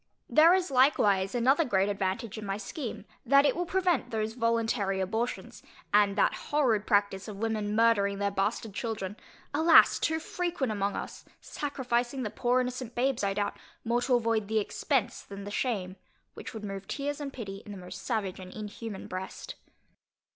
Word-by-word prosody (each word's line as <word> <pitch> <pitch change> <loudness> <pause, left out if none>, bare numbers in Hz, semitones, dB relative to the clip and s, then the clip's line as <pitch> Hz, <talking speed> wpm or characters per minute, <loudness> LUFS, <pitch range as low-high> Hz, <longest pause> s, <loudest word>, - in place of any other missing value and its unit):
There 330 +4 +6
is 370 -3 -1
likewise 210 -7 +3
another 265 +7 +4
great 195 -8 +2
advantage 195 +2 -2
in 215 - -6
my 195 -1 -2
scheme, 230 +4 -6 0.2
that 275 +3 +5
it - - +3
will 355 0 -2
prevent 365 -5 +1
those 220 0 -2
voluntary 230 -4 0
abortions, 220 +6 -3 0.3
and 205 -1 +4
that 200 - +3 0.2
horrid 245 -8 +2
practice 200 -1 +1
of 210 -2 -7
women 215 -1 -1
murdering 210 -3 +3
their 200 0 0
bastard 200 +2 -1
children, 210 -3 -4 0.4
alas! 320 +3 +6
too 320 - +1
frequent 340 -6 -2
among 200 -1 -1
us, - - -6 0.2
sacrificing 255 -2 -2
the 210 - -3
poor 250 +1 +2
innocent 250 -1 -5
babes, 255 -2 +1
I 195 0 0
doubt, 205 0 -1 0.3
more 235 +1 +1
to 250 0 +2
avoid 225 -3 +1
the 220 +1 0
expence 225 +3 0
than 200 0 -9
the 205 - -7
shame, 200 -6 -2 0.4
which - - -9
would 215 - -6
move 195 -1 -6
tears 290 +1 -3
and 280 -1 -4
pity 200 -6 -7
in 210 - -10
the 200 - -7
most 180 -1 -9
savage 205 -6 -2
and 185 -1 -9
inhuman 210 0 -7
breast. 185 +1 -6
220 Hz, 175 wpm, -29 LUFS, 200-255 Hz, 0.4 s, There